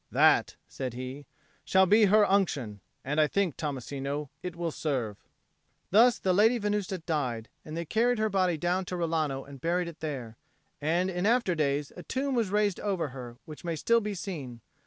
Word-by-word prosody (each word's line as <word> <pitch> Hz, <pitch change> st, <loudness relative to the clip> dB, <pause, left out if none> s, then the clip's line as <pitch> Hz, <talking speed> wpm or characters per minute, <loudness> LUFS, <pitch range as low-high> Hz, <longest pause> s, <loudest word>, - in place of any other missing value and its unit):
"That," -, -, +4 dB
said 130 Hz, -3 st, -5 dB
he, 130 Hz, +2 st, -7 dB, 0.4 s
"shall 190 Hz, 0 st, +4 dB
be 210 Hz, +3 st, +6 dB
her 210 Hz, +1 st, +5 dB
Unction; 145 Hz, -, 0 dB, 0.3 s
and 150 Hz, +3 st, +2 dB
I 150 Hz, -, +4 dB
think, 190 Hz, -3 st, 0 dB
Tommasino, 140 Hz, 0 st, -4 dB
it 180 Hz, -2 st, -5 dB
will 170 Hz, -1 st, -2 dB
serve." 125 Hz, -10 st, -2 dB, 0.7 s
Thus 230 Hz, +5 st, +6 dB
the 185 Hz, -, +1 dB
Lady 220 Hz, +6 st, +5 dB
Venusta 205 Hz, -3 st, -1 dB
died, 140 Hz, -9 st, -2 dB
and 155 Hz, +1 st, -7 dB
they 170 Hz, -, -3 dB
carried 235 Hz, +7 st, +2 dB
her 215 Hz, 0 st, +2 dB
body 185 Hz, -4 st, +1 dB
down 175 Hz, +3 st, 0 dB
to 180 Hz, -, -4 dB
Rilano 155 Hz, -5 st, -1 dB
and 140 Hz, -2 st, -11 dB
buried 175 Hz, +1 st, 0 dB
it 170 Hz, -2 st, -9 dB
there. 130 Hz, -8 st, -5 dB, 0.4 s
And 175 Hz, +5 st, +1 dB
in 180 Hz, +2 st, 0 dB
after 235 Hz, -5 st, +3 dB
days 145 Hz, -2 st, 0 dB
a 180 Hz, -, -8 dB
tomb 270 Hz, +7 st, -2 dB
was 230 Hz, -5 st, +1 dB
raised 205 Hz, -1 st, +1 dB
over 185 Hz, -7 st, -1 dB
her, 125 Hz, -2 st, -9 dB
which 155 Hz, -2 st, -10 dB
may 170 Hz, -1 st, -2 dB
still 230 Hz, +9 st, +3 dB
be 210 Hz, -1 st, -3 dB
seen. 140 Hz, -, -6 dB
170 Hz, 185 wpm, -29 LUFS, 140-200 Hz, 0.7 s, be